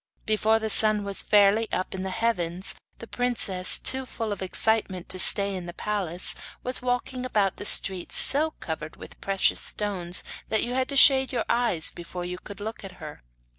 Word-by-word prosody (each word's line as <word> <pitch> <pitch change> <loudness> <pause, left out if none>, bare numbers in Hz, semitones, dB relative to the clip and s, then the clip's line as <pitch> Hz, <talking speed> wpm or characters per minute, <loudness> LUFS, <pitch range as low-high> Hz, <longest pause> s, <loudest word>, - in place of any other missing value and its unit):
Before 215 +1 +1
the 220 -1 -3
sun 215 -1 +4
was 200 -1 0
fairly 210 +2 +2
up 185 - -3
in 190 - -6
the 190 - -5
heavens 185 -4 -1 0.2
the - - -11
princess, 225 -7 0
too 265 0 0
full 225 -3 -6
of 200 - -10
excitement 190 -1 +1
to 185 - -6
stay 200 +1 +5
in 180 -2 -7
the 175 - -10
palace, 185 -4 -1 0.3
was 255 0 +1
walking 250 +1 -3
about 205 -6 -1
the 205 - -1
streets 190 -2 +3
so 300 +4 +5
covered 155 -1 -7
with - - -14
precious 195 -1 +1
stones 185 -4 -4 0.3
that 220 0 0
you 240 - -4
had 260 0 -2
to 280 - -2
shade 265 -1 +6
your 240 -4 -3
eyes 235 -9 +1
before 175 +1 -9
you 180 0 -7
could 205 +1 -11
look 220 +1 -7
at 195 -1 -9
her. 155 -4 -12
205 Hz, 190 wpm, -24 LUFS, 185-230 Hz, 0.3 s, shade